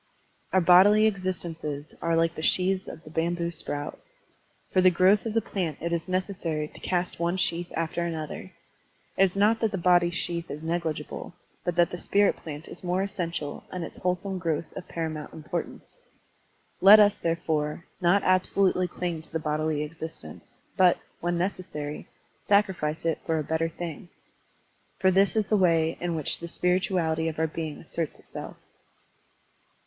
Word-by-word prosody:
Our 190 - +4
bodily 195 +5 +7
existences 170 -7 -2
are 165 0 +1
like 165 0 +2
the 155 - -6
sheaths 185 +3 +2
of 160 - -9
the 155 - -12
bamboo 170 +1 -1
sprout. 145 -3 -2 0.7
For 185 - +5
the 185 - +7
growth 190 +5 +4
of 220 - -4
the 225 - +2
plant 175 -9 -3
it 170 +1 -2
is 170 +1 -2
necessary 185 -5 -2
to - - -14
cast 180 -2 -1
one 170 +2 0
sheath 175 -1 0
after 165 +1 -1
another. 165 +2 -5 0.6
It - - +4
is 190 +1 -3
not 215 +3 +4
that 225 - +2
the 195 - -2
body 175 -1 +4
sheath 170 -1 -2
is 150 +2 -6
negligible, 165 0 -3 0.3
but 175 - -1
that 175 0 +3
the 175 - -5
spirit 205 +2 +2
plant 155 0 -8
is - - -11
more 180 +1 0
essen 195 -4 -3
tial 150 -3 -5
and 180 -2 -4
its - - -8
wholesome 185 +1 -1
growth 165 -2 -2
of 185 - -7
paramount 160 -2 -4
importance. 155 -1 -6 0.8
Let 205 +3 +10
us, 205 -1 +5
therefore, 160 -2 -1 0.2
not 180 +3 +4
absolutely 185 0 +3
cUng 175 -2 -4
to 160 - -16
the - - 0
bodily 155 -1 -1
existence, 155 - -9 0.2
but, 180 -2 +5 0.2
when 175 0 -1
necessary, 175 -5 -4 0.4
sacrifice 190 -7 +1
it 165 -2 +1
for 160 - +1
a 155 - -1
better 160 +2 0
thing. 170 0 -7 0.9
For 190 - +3
this 195 +3 +3
is 215 -1 +2
the 215 - +2
way 165 -3 +3
in 175 -1 -1
which 155 -3 0
the 170 - -6
spirituality 175 -2 +1
of 160 - -3
our 160 - +2
being 160 -1 -4
asserts 165 -1 -4
itself. - - -9
170 Hz, 170 wpm, -27 LUFS, 160-185 Hz, 0.9 s, Let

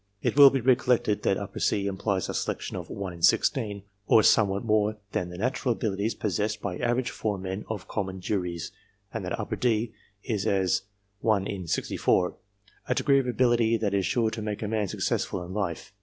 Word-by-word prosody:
It - - +1
will 140 -1 +10
be 135 -1 -1
recollected 125 -3 +2
that 100 0 0
C 100 -1 +1
implies 100 -1 -1
a - - -4
selection - - -3
of - - -6
1 95 -2 -5
in 85 - -12
16, 100 +3 +2 0.2
or 110 - +6
some 110 0 +5
what 100 +3 -3
more 110 -1 +2
than 90 - -2
the 90 - -8
natural 125 +3 0
abilities 105 0 -2
possessed 105 +1 -1
by 95 -3 -4
average 120 +1 0
foremen 95 -2 -3
of 110 -4 -5
common 95 -2 -3
juries, 90 -3 -3 0.4
and - - -3
that - - -3
D 115 -2 +1 0.3
is 105 -6 -2
as 95 -1 +2 0.4
1 105 -3 +2
in 95 -3 -5
64 90 +2 +1 0.5
a - - +1
degree 140 -2 +4
of 130 - -2
ability 120 -2 +3
that 105 -2 -1
is 100 -1 +2
sure 115 0 +1
to 110 0 -5
make 105 0 -4
a - - -2
man 105 -1 0
successful 90 0 -2
in 90 - -8
life. 95 -2 -3
105 Hz, 185 wpm, -27 LUFS, 95-115 Hz, 0.5 s, will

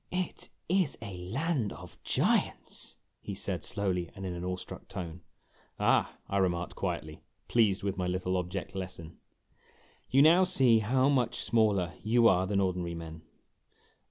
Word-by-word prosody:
"It 180 -1 -3 0.2
is 180 -4 +1
a 100 -5 -7
land 115 - -1
of - - -12
giants! - - -1
" - - -49
he - - -5
said, - - -3
slowly 90 -4 -1
and 95 - -6
in 90 - -3
an 85 0 -5
awe 90 0 -1
struck 90 - -10
tone. 90 -3 -6 0.6
"Ah!" - - +2
I 100 - -1
remarked 90 -2 0
quietly, 85 -5 -4 0.3
pleased 105 -5 +3
with 100 -1 -2
my 90 - 0
little 90 +1 -1
object 90 +1 -3
lesson, 90 -4 -7 0.9
"you 135 +2 +6
now 170 +4 +7
see 130 -11 +4
how 130 +5 +2
much 125 -4 +1
smaller 105 -6 +2
you 115 +2 +4
are 95 -2 +3
than 100 0 +1
ordinary 90 -3 -1
men." 80 -1 -8
95 Hz, 155 wpm, -30 LUFS, 90-120 Hz, 0.9 s, now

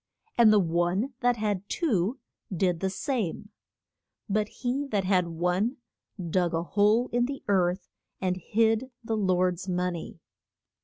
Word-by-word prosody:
And 230 -2 +7
the 215 - +6
one 175 +8 0
that 245 -2 +3
had 205 -2 -2
two 235 - 0 0.3
did 180 -2 +1
the 190 - 0
same. 205 - -3 0.8
But 210 0 +1
he 270 +3 -2
that 205 -6 0
had 185 -2 +2
one 180 +8 0 0.5
dug 175 -2 +1
a 165 - 0
hole 210 +6 +3
in 240 0 +2
the 275 0 -6
earth 185 -2 +1 0.3
and 185 -1 0
hid 220 +5 +2 0.2
his 225 - -5
lord's 185 -3 +1
mon 180 0 0
ey. 165 0 -8
195 Hz, 145 wpm, -27 LUFS, 180-225 Hz, 0.8 s, And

